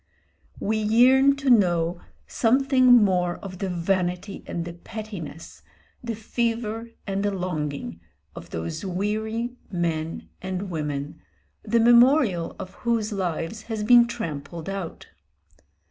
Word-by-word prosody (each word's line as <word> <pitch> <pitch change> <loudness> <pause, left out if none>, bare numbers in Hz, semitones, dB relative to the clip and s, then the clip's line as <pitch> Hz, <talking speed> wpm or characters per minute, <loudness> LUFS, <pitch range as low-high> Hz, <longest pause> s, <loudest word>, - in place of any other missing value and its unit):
We 220 +1 0
yearn 255 +6 +5
to 275 -2 +1
know 175 -5 +3 0.2
something 260 +2 +2
more 190 -8 +5
of 185 -2 -9
the 195 - -2
vanity 180 +2 -1
and 170 -1 -3
the 170 - -6
pettiness, 175 -4 -8 0.4
the 230 -2 -3
fever 230 0 -2 0.2
and 195 -1 -2
the 205 - +1
longing, 150 - -4 0.3
of - - -10
those 80 - -5
weary 220 +6 -2
men 165 -3 -2
and 190 +1 -4
women, 150 -3 -4 0.4
the 235 - +1
memorial 235 - +4
of 185 - -8
whose 230 -3 0
lives 185 +1 -3
has 220 -2 -2
been 240 +2 +7
trampled 165 -5 -6
out. 195 -4 -5
195 Hz, 120 wpm, -25 LUFS, 175-230 Hz, 0.4 s, been